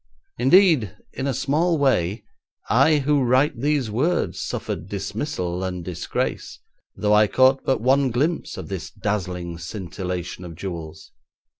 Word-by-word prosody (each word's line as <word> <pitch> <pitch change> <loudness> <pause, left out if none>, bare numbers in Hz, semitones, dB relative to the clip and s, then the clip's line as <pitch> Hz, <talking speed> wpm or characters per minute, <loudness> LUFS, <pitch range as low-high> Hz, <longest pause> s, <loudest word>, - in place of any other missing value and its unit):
Indeed, 140 - +4 0.2
in 135 +2 -3
a 135 - 0
small 155 +6 +1
way, 115 - +1 0.5
I 135 +7 +5
who 145 0 +2
write 130 +1 +2
these 145 -5 +1
words 155 +11 0
suffered 90 - -4
dismissal 100 -3 -3
and 90 -2 -4
disgrace, 85 -2 -3 0.4
though 105 0 +1
I 105 0 +6
caught 130 +4 +4
but 130 - +1
one 135 +2 +3
glimpse 145 +8 -1
of - - -6
this 95 -4 -5
dazzling 90 -4 -3
scintillation 90 0 -5
of 85 -2 -8
jewels. 85 -3 -7
110 Hz, 135 wpm, -23 LUFS, 90-140 Hz, 0.5 s, I